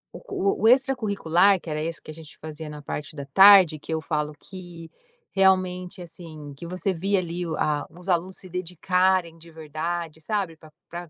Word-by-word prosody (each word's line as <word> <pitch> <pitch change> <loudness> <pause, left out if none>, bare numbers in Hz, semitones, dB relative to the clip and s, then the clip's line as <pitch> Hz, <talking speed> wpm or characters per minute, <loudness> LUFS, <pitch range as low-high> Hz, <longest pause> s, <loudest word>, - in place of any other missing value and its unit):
o 200 - -2
o - - +6
extracurricular 205 -8 +3
que 165 - -10
era 155 0 -2
esse 165 +1 -4
que 155 - -10
a - - -9
gente 155 -1 -13
fazia 155 0 -8
na 150 0 -8
parte 150 +2 -6
da 140 -2 -6
tarde, 185 +1 +7
que 155 - -9
eu 160 - 0
falo 150 -1 -2
que, 175 -3 -11 0.4
realmente, 185 -1 +1
assim, 155 -4 -10
que 170 +5 -9
você 185 +2 -1
via 195 +4 0
ali 175 0 -4
o 160 - -3
a 145 -1 -1
os 180 +3 -9
alunos 180 +2 0
se 185 - -8
dedicarem 180 0 0
de 165 +1 -15
verdade, 160 +1 -5
sabe, 195 -2 -2
pra 155 -1 -17 0.2
pra 175 -1 -7
170 Hz, 190 wpm, -25 LUFS, 155-185 Hz, 0.4 s, tarde